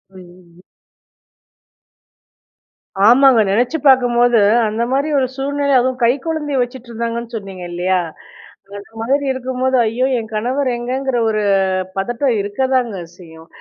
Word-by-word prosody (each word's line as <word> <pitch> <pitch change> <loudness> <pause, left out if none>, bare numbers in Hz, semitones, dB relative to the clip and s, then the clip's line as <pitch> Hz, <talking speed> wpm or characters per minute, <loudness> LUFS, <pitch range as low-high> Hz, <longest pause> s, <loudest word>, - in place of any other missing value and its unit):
அய்யய்யோ! 180 -1 -17 2.4
ஆமாங்க. 260 +1 +6
நெனைச்சி 245 +9 +1
பார்க்கும்போது 245 -2 +4 0.3
அந்த 220 +2 -2
மாதிரி 280 +3 0
1 260 - +1
சூழ்நிலை 280 +1 -1
அதுவும் 255 +1 -1
கை 235 +1 +4
குழந்தைய 295 -4 -2
வச்சுட்ருந்தாங்கன்னு 235 -1 -5
சொன்னீங்க, 195 -4 -7
இல்லையா? 180 +2 0 0.8
அந்த 200 +1 -12
மாதிரி 275 +5 0
இருக்கும்போது 260 0 -2
"ஐயோ! 230 +4 0
என் 220 -2 -5
கணவர் 255 +6 -1
எங்கங்கிற 255 +2 -2
1 215 -1 -1 0.6
பதட்டம் 240 +5 -1
இருக்கதாங்க 240 +1 -1 0.2
செய்யும்" 160 -2 -15
240 Hz, 110 wpm, -17 LUFS, 215-260 Hz, 2.4 s, ஆமாங்க